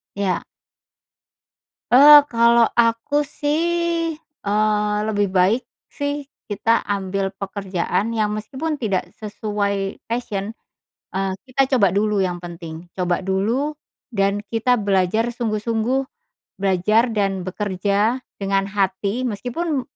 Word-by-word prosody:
Iya. 200 -2 -1 1.5
Eee, 290 +3 +10
kalau 235 0 +4
aku 230 +4 +2
sih, 330 +3 0
eee, 210 -8 -1
lebih 205 -1 +1
baik 190 +6 +2 0.2
sih 285 0 -3 0.2
kita 225 +2 +2
ambil 195 -1 -2
pekerjaan 195 +2 -2
yang 215 -1 +1
meskipun 265 +9 -4
tidak 190 -6 -1
sesuai 205 -2 -2
passion, 220 -3 -3 0.6
eee, 195 0 0
kita 265 +1 +1
coba 200 -8 +3
dulu 210 0 +1
yang 180 -2 -1
penting. 170 0 -9
Coba 180 -1 -1
dulu, 230 +11 -1 0.3
dan 200 -1 0
kita 235 +2 +2
belajar 205 +2 +1
sungguh-sungguh, 230 +2 -1 0.6
belajar 210 +5 +3
dan 195 -3 0
bekerja 200 +5 0 0.2
dengan 195 0 0
hati 200 +4 -1
meskipun 260 +7 -2
210 Hz, 105 wpm, -21 LUFS, 195-245 Hz, 1.5 s, Eee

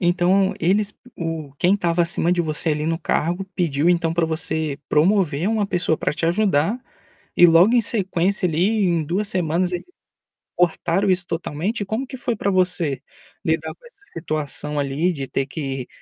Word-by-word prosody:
Então 180 +2 +2
eles 200 +5 +1 0.2
o 165 -4 -4
quem 185 +3 +3
estava 175 -3 +1
acima 170 +1 +1
de 175 - +1
você, 155 0 -1
ali, 150 0 -1
no 165 0 0
cargo, 175 +3 -1
pediu 165 -3 +1
então 165 -2 +1
para 170 -1 +2
você 160 -2 -2
promover 170 0 +2
uma 215 -2 0
pessoa 175 -4 0
para - - -1
te 165 +2 -4
ajudar, 190 - +1 0.6
e 175 - +8
logo 175 +8 +5
em 240 - +5
sequência 190 -3 0
ali, 195 +7 +1
em 170 -3 +1
2 190 +7 -1
semanas 180 +1 0
eles 175 - -4 0.7
cortaram 180 +2 +1
isso 185 -1 +1
totalmente? 175 +6 -3
Como 220 +7 -3
que 265 - -8
foi 245 -2 -2
para 200 - -1
você 180 -7 +1 0.4
lidar - - -1
com - - -23
essa 405 -4 -22
situação 150 -2 -3
ali 145 +6 0
de 135 -4 -5
ter 135 - -1
que 135 -4 -5
175 Hz, 170 wpm, -21 LUFS, 155-195 Hz, 0.7 s, e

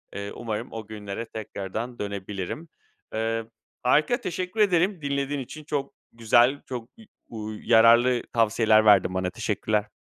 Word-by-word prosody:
Eee, 100 0 -5
umarım 115 0 -4
o 110 -2 -7
günlere 105 +1 -6
tekrardan 110 +2 -6
dönebilirim. 100 - -5 0.5
Eee, 115 0 -1 0.4
harika, 155 - +3
teşekkür 185 +4 -4
ederim 185 -2 +3
dinlediğin 140 0 -1
için. 150 +4 -8
Çok 145 -2 -3 0.2
güzel, 120 +4 +3
çok, 120 -2 -6
i 220 - -14 0.2
uuu, 110 -1 -6
yararlı 120 +2 +5
tavsiyeler 110 -1 +4
verdin 95 -3 +5
bana. 95 -1 -1
Teşekkürler. 105 0 -1
115 Hz, 130 wpm, -26 LUFS, 105-140 Hz, 0.5 s, yararlı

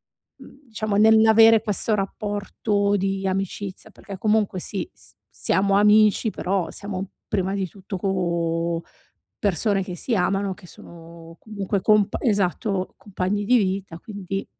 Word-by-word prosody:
mhmm, 280 - -19
diciamo 215 -2 -2
nell'avere 220 +1 +6
questo 215 +1 0
rapporto 205 0 -1
di 195 0 -2
amicizia, 195 0 -4
perché 195 - -10
comunque, 210 -2 +1
sì, 200 - -4
s - - -15 0.2
siamo 195 +1 +1
amici, 210 +2 +4
però 190 -2 -2
siamo 195 -1 -5 0.2
prima 190 -1 -1
di 195 -1 -2
tutto 195 +2 -8
co 170 -3 -1 0.6
persone 200 - +2
che 185 -1 -7
si 230 +7 -2
amano, 195 +1 0
che 195 - -16
sono 165 0 -13
comunque 200 -2 -3
compa 210 0 +3
Esatto, 195 -2 0
compagni 205 +1 -3
di 250 +4 +4
vita, 190 -4 -2
quinti 195 -3 -6
195 Hz, 130 wpm, -23 LUFS, 185-210 Hz, 0.6 s, nell'avere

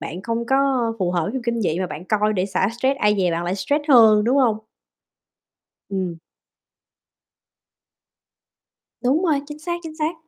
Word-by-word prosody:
bạn 180 +3 -7
không 230 +2 -3
có 270 - +2 0.4
phù 180 -3 0
hợp 175 -2 0
với 205 - -3
phim 265 - -4
kinh 235 -1 -2
dị 175 -5 -1
mà 185 - -1
bạn 160 0 -8
coi 210 +2 +1
để 185 -1 -1
xả 190 0 0
stress, 265 +3 +1
ai 210 0 +3
dè 180 -2 +2
bạn 170 +1 -2
lại 175 +2 -1
stress 290 +9 -1
hơn, 220 -6 +6
đúng 250 +4 +2
hông? 230 -5 +2 1.3
Ừm. 185 -4 -3 2.8
Đúng 270 +7 +2
rồi, 305 -5 +2
chính 295 0 -9
xác, 345 +3 -3
chính 315 -2 -9
xác. 315 +2 -1
220 Hz, 175 wpm, -21 LUFS, 185-270 Hz, 2.8 s, hơn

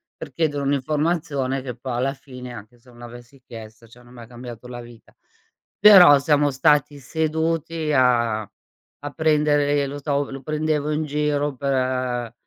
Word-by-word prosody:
per - - -10
chiedere 150 -3 -1
un'informazione 140 -1 -1
che, 125 -2 -7
po 125 +2 -7
alla 130 +3 -1
fine, 125 -3 -11
anche 110 +2 -12
se 125 +2 -23
non 120 0 -18
l'avessi 120 +2 -13
chiesta, 115 -1 -12
cioè, 125 +2 -18
non 120 +1 -18
mi 120 - -12
ha 115 - -12
cambiato 120 0 -10
la 120 -1 -7
vita. 120 -1 -15 0.7
Però, 185 -8 +8
siamo 145 0 +2
stati 145 +2 +2
seduti 160 +2 -2
a 120 -4 +2 0.6
a 145 0 -8
prendere 145 -2 +1
lo 145 +1 -7
so, 140 -1 -2
lo 135 - -8
prendevo 150 +1 -2
in 155 +1 -1
giro 145 -1 -1
per 130 -3 -2
135 Hz, 160 wpm, -22 LUFS, 125-150 Hz, 0.7 s, Però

